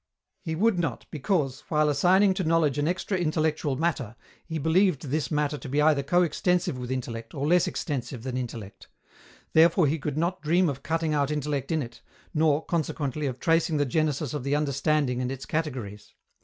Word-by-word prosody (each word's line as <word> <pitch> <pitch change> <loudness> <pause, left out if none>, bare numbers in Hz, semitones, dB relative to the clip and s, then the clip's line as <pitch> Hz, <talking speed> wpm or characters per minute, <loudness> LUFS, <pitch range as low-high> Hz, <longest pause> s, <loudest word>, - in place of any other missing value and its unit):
He 160 - -3
would 205 +1 +2
not, 165 - -2
because, 150 -3 -1
while 150 -1 +2
assigning 185 +7 +4
to 190 0 -2
knowledge 160 -4 +2
an 145 - +1
extra 185 +2 -1
intellectual 155 -3 0
matter, 140 -7 -1 0.3
he 160 -1 -3
believed 165 0 +2
this 150 +2 -2
matter 150 -1 -1
to 145 - -8
be 145 +3 0
either 150 -1 +4
coextensive 175 +2 +1
with 125 -1 -6
intellect 115 -3 -5
or 140 0 -2
less 175 +3 +3
extensive 125 -5 -4
than 130 -1 -4
intellect. 115 -5 -6 0.7
Therefore 165 +2 +5
he 150 +3 0
could 145 0 -3
not 175 +3 -1
dream 170 +3 +2
of 135 -1 -5
cutting 160 +1 -1
out 145 -2 +1
intellect 150 -1 -2
in 160 -3 +1
it, 120 -1 -11 0.3
nor, 155 -1 +2
consequently, 150 -3 -2
of 130 -1 -4
tracing 165 -2 +2
the 145 - +2
genesis 150 -1 -1
of 145 -4 -3
the 140 +2 0
understanding 140 -2 0
and 125 0 -2
its 135 0 -6
categories. 125 -10 -4
150 Hz, 185 wpm, -26 LUFS, 135-165 Hz, 0.7 s, Therefore